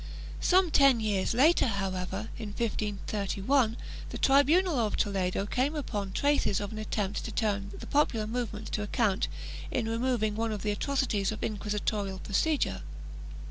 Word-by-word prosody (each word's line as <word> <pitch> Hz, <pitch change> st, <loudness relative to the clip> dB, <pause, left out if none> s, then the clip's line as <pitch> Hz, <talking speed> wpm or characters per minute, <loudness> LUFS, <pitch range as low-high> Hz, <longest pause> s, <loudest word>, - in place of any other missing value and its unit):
Some 370 Hz, -2 st, +3 dB
ten 275 Hz, -5 st, +6 dB
years 210 Hz, -1 st, 0 dB
later, 295 Hz, +4 st, +5 dB
however, 195 Hz, 0 st, -3 dB
in 220 Hz, -3 st, -5 dB
1531, 215 Hz, +2 st, 0 dB, 0.3 s
the -, -, -5 dB
tribunal 290 Hz, +3 st, +4 dB
of 215 Hz, -3 st, 0 dB
Toledo 195 Hz, -1 st, 0 dB
came 260 Hz, +8 st, 0 dB
upon 205 Hz, -9 st, -3 dB
traces 285 Hz, -4 st, +2 dB
of 205 Hz, -1 st, -4 dB
an 215 Hz, -, -6 dB
attempt 210 Hz, -2 st, -2 dB
to 225 Hz, -, -5 dB
turn 200 Hz, -2 st, -1 dB
the -, -, -8 dB
popular 250 Hz, -7 st, +1 dB
movement 225 Hz, -1 st, -4 dB
to 210 Hz, -, -1 dB
account 210 Hz, -, +1 dB, 0.4 s
in 220 Hz, -, -1 dB
removing 230 Hz, -2 st, 0 dB
one 225 Hz, 0 st, -1 dB
of 210 Hz, -3 st, -4 dB
the 210 Hz, -, +1 dB
atrocities 220 Hz, -4 st, 0 dB
of 215 Hz, -, -5 dB
inquisitorial 205 Hz, -2 st, -2 dB
procedure. 200 Hz, -, 0 dB
215 Hz, 145 wpm, -29 LUFS, 200-255 Hz, 0.4 s, ten